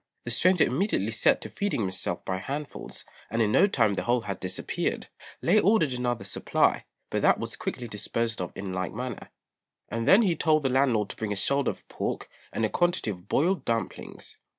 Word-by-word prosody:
The - - -1
stranger 185 -2 +4
immediately 125 - 0
set 110 - +3
to - - -6
feeding 200 - -1
himself 95 -2 -3
by 95 - -1
handfuls, 140 +8 -6 0.2
and 115 - -2
in 110 -2 +3
no 200 - +5
time 115 - +2
the - - -1
whole 120 0 +1
had 100 -3 -5
disappeared. 95 - -2 0.3
Lê 210 +5 +4
ordered 200 - +3
another 120 -4 -1
supply, 100 - +1 0.3
but - - 0
that - - +5
was - - -4
quickly 120 - -4
disposed 110 +1 -2
of 90 - -4
in 95 -1 -5
like 95 0 -2
manner; 125 +1 -5 0.6
and 115 +1 -2
then 215 +5 +7
he 180 -5 +2
told 155 -2 +2
the 135 - +2
landlord 125 -6 +2
to - - -6
bring 110 -2 -3
a - - 0
shoulder 140 +7 +1
of - - -7
pork - - -4 0.2
and 115 - 0
a - - 0
quantity 175 - +1
of 90 0 -10
boiled 170 - +1
dumplings. 115 -2 -4
115 Hz, 195 wpm, -27 LUFS, 105-150 Hz, 0.6 s, then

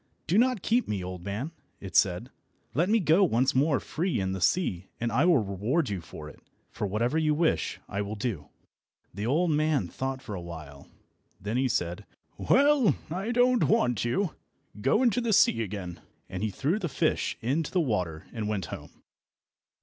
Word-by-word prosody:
"Do 180 +7 +3
not 250 -5 +2
keep 240 +2 +2
me, 100 -3 -2
old 90 -1 -6
man," 105 - -4 0.3
it 95 - -9
said; 95 +7 +2 0.4
"let 170 +6 +1
me 225 +1 +4
go 170 +2 +4
once 130 -5 +2
more 140 +2 +3
free 175 - -2
in 95 -1 -1
the 95 -1 -4
sea 95 - +1
and 115 0 -1
I 130 +9 +3
will 175 -4 +5
reward 110 - 0
you 100 -4 -3
for 75 -2 -10
it, 75 - -13 0.3
for 105 - -3
whatever 120 +10 0
you 155 -1 +2
wish 165 +1 0
I 100 0 -3
will 105 +1 -4
do." 100 - -3 0.7
The 100 +4 -3
old 165 +6 +2
man 150 - +1
thought 130 +4 -4
for 105 - -6
a 95 - -4
while. 75 -5 -9 0.5
Then 105 +5 -2
he 130 +1 +2
said, 90 -8 -2 0.3
"Well, 280 -3 +4 0.2
I 190 +6 -3
don't 245 0 +4
want 125 - +2
you. 160 +10 0 0.5
Go 175 - +3
into 245 -1 +3
the 230 -2 +1
sea 195 - +4
again," 95 -5 -5 0.3
and 90 - -6
he 110 - 0
threw 145 - -1
the 175 - -2
fish - - 0
into 145 +7 -1
the 185 - +1
water 90 - -1
and 110 -3 -3
went 105 -4 -2
home. - - -10
125 Hz, 190 wpm, -28 LUFS, -, 0.7 s, will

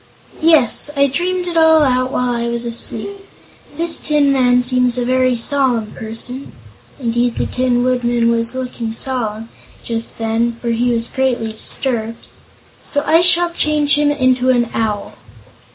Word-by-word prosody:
"Yes; 310 -5 +3
I 280 0 +3
dreamed 360 +6 -2
it 345 - -4
all 320 -1 +5
out 255 -1 0
while 250 -2 -1
I 235 0 -2
was 235 0 -3
asleep. 235 +11 -2 0.6
This 335 0 +1
Tin 295 -2 +1
Man 250 -2 +2
seems 250 -1 0
a 245 - -1
very 255 0 +1
solemn 245 -3 0
person 245 +4 +1 0.2
" - - -28
indeed, 240 -1 -1
the - - -2
Tin 250 -1 0
Woodman 240 -2 +1
was 230 +1 -2
looking 245 -3 -5
solemn, 225 -3 -3 0.3
just 230 -1 -4
then, 225 +1 -1
for 235 - -4
he 240 +2 0
was 230 0 -1
greatly 250 -4 -2
disturbed 230 0 -2 0.6
"so 285 0 -1
I 320 +3 +4
shall 350 0 +3
change 300 -3 +1
him 295 0 +2
into 255 -3 +1
an 240 -2 +1
Owl." 215 -2 -3
250 Hz, 155 wpm, -16 LUFS, 235-285 Hz, 0.6 s, all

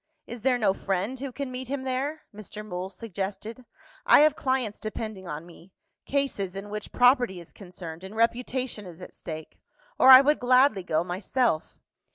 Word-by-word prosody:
"Is 240 -1 -8
there 255 0 +2
no 205 -5 +2
friend 200 +6 -2
who 275 0 -5
can 275 0 -5
meet 255 0 -5
him 270 0 -3
there?" 275 +4 -3
Mr. 210 0 -9
Mool 185 -2 -5
suggested. 205 +3 -6 0.4
"I - - +7
have 305 -1 +5
clients 260 -8 -1
depending 215 -3 -6
on 150 +1 -6
me 175 +2 -16 0.3
cases, 265 -10 -1
in 200 +1 -7
which 210 0 -6
property 245 -6 +3
is 170 - -13
concerned, 175 -3 -9
and 190 +3 -9
reputation 235 -1 -1
is 170 -1 -12
at 180 - -11
stake 160 -1 -8 0.4
or 260 - +7
I 260 0 +12
would 295 +2 +2
gladly 255 -4 +4
go 170 -3 0
myself. 185 +1 -1
215 Hz, 175 wpm, -26 LUFS, 190-255 Hz, 0.4 s, I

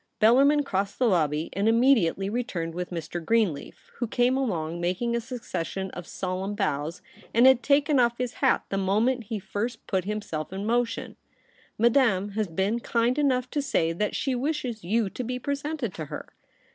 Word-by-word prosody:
Bellarmin 275 +7 +5
crossed 200 -5 -2
the 255 - +2
lobby, 160 -6 +1
and 200 +2 0
imme 245 +5 +6
diately 195 -1 -1
returned 190 -9 -3
with 180 +1 -4
Mr. 170 0 -5
Greenleaf, 210 -6 -1
who 240 - -2
came 245 +3 +2
alonsf 175 -11 -1
makingf 185 +7 0
a - - -2
succession 195 -6 -4
of 175 -1 -8
solemn 190 +2 -3
bows, 155 -4 -2 0.3
and 235 +2 +6
had 260 -2 +7
taken 285 +2 +3
off 235 -1 +3
his 250 -1 -2
hat 265 - +3
the 195 - -1
moment 220 +6 +1
he 215 +2 -3
first 205 +4 -4
put 190 -2 -1
himself 200 -7 -4
in 195 +2 -4
motion. 235 +1 -1 0.3
* - - -32
Madame 230 -4 +3
has 210 +1 -1
been 190 +7 0
kind 235 +3 +1
enough 255 -3 +2
to 290 - 0
say 165 -11 +1
that 210 +5 -1
she 270 - 0
wishes 255 - -2
you 215 +4 +1
to 250 - -5
be 250 +1 -3
presented 280 -3 -3
to 155 - -5
her.' - - -7
220 Hz, 185 wpm, -26 LUFS, 185-250 Hz, 0.3 s, had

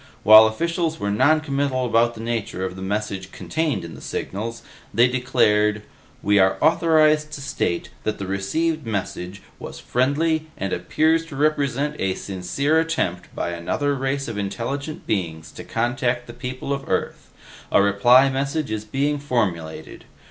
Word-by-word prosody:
While 110 +1 +9
officials 165 +7 -1
were 100 - -1
noncommittal 140 +1 +1
about 115 0 +2
the 110 - -8
nature 115 -5 -3
of 95 - -5
the 95 - -9
message 95 -1 -3
contained 160 - -2
in 85 - -9
the - - -11
signals, 115 +4 -5 0.3
they 120 +2 +4
declared, 105 -5 +2 0.4
'We 105 0 +4
are 95 0 +4
authorized 155 -1 +3
to 145 - -6
state 90 -10 -2
that 110 0 -2
the 100 - -5
received 155 - -1
message 100 -2 -4 0.2
was - - -8
friendly 155 +5 0
and 95 -1 -3
appears 160 - +1
to 145 - -9
represent 145 0 0
a 95 -1 0
sincere 100 - -1
attempt 125 - -2
by 85 - -2
another 115 - -1
race 135 +1 -2
of 110 -3 -4
intelligent 135 +9 -4
beings 80 -6 -3
to - - -9
contact 120 +1 -1
the 120 - -10
people 130 +3 -4
of 140 0 -5
Earth. 95 - -2 0.4
A - - +5
reply 110 +7 +5
message 140 +1 -2
is 110 -1 -2
being 140 +6 -1
formulated.' 100 - -3
120 Hz, 155 wpm, -22 LUFS, 100-145 Hz, 0.4 s, While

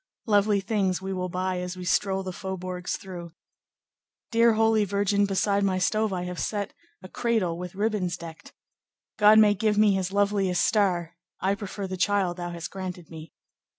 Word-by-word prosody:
"Lovely 205 -2 +3
things 195 -3 0
we 190 0 -4
will 180 -1 -3
buy 185 +1 -2
As 180 0 -5
we 180 - -7
stroll 195 +1 +1
the 185 - -4
faubourgs 185 -1 -4
through. 175 -5 -9 1.0
"Dear 230 0 +5
Holy 220 -1 +3
Virgin, 200 0 +1
beside 200 +1 +1
my 190 -2 +1
stove 215 +3 +1
I 180 -2 -2
have 180 0 -5
set 205 -2 -2 0.3
a - - -8
cradle 215 -5 0
with 180 +1 -7
ribbons 200 -4 -1
decked. 165 -2 -11 0.7
God 210 +1 +7
may 210 -1 +6
give 210 +1 0
me 210 -1 +5
his 190 -1 -1
loveliest 200 -2 +1
star; 180 -5 +1 0.2
I 195 +1 +1
prefer 200 -1 -5
the 185 0 -5
child 185 -1 +1
thou 175 0 -4
hast 170 -1 -6
granted 180 -3 -7
me. 160 -1 -10
190 Hz, 175 wpm, -26 LUFS, 180-205 Hz, 1.0 s, God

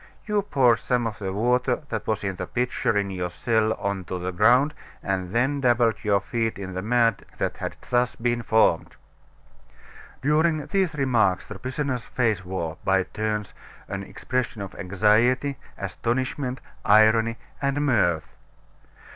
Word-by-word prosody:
You 210 -2 +1
poured 130 - +3
some 125 -1 0
of 110 -2 -4
the 95 -2 -3
water 125 +6 +1
that - - -4
was 110 -2 -1
in 95 -2 -2
the 90 - -4
pitcher 125 -3 0
in 100 -1 0
your 90 -1 -3
cell 110 0 +1
on 100 -2 -3
to 90 - -4
the 90 +1 -3
ground 125 - +4 0.3
and 95 -2 -2
then 135 +5 +1
dabbled 120 -3 +3
your 100 -2 +3
feet 115 +3 -2
in 95 -1 -6
the 95 - -3
mud 115 0 +2
that - - -2
had - - -4
thus 125 0 +1
been 120 0 0
formed." 110 -7 +2 1.3
During 155 +1 +2
these 185 0 0
remarks 120 -9 +2
the 105 -2 -9
prisoner's 130 0 -3
face 110 -7 0
wore, 90 -3 -4
by 95 -1 +3
turns, 105 +1 -3 0.3
an 100 0 -4
expression 115 +1 -3
of 95 - -8
anxiety, 110 +8 +2 0.2
astonishment, 125 +7 -2 0.2
irony, 110 +2 +5 0.2
and 140 +1 0
mirth. 90 - +2
115 Hz, 150 wpm, -25 LUFS, 100-125 Hz, 1.3 s, irony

